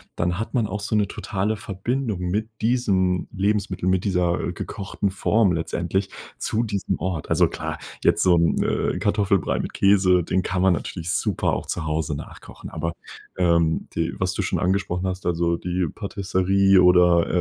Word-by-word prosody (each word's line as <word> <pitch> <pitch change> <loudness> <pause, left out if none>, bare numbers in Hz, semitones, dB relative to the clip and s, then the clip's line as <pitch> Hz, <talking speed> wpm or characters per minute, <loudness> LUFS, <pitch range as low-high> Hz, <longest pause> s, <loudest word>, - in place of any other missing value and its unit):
dann 90 +2 -1
hat 110 - -4
man 120 -3 +2
auch 105 0 -4
so 105 +2 -2
'ne 105 -1 +2
totale 100 +2 -2
Verbindung 110 +1 -3
mit 100 +5 -2
diesem 100 -6 +1
Lebensmittel, 100 -2 -1
mit 95 -1 +2
dieser 90 -3 0
gekochten 100 0 -4
Form 105 +1 +2
letztendlich 85 +3 -1 0.3
zu 110 +2 0
diesem 100 -4 -2
Ort. 85 -3 -3
Also, - - +4
klar, - - -5 0.3
jetzt - - +3
so 90 -2 +5
'n, 85 0 +2
äh, - - 0
Kartoffelbrei 100 -1 +1
mit - - -4
Käse, 95 -3 +4
den 95 +3 0
kann 90 0 -1
man 95 -2 +5
natürlich 85 +2 -4
super - - 0
auch - - -3
zu 80 - -3
Hause 75 -1 -1
nachkochen. - - -10
Aber, 85 +1 -3 0.4
ähm, 85 -3 +2
die - - -1
was - - 0
du - - -2
schon - - -1
angesprochen 95 -1 0
hast, 95 -1 -4
also, 85 0 +1
die 90 0 -1
Patisserie 95 -1 +2
oder, 90 -1 +5
95 Hz, 170 wpm, -23 LUFS, 90-100 Hz, 0.4 s, so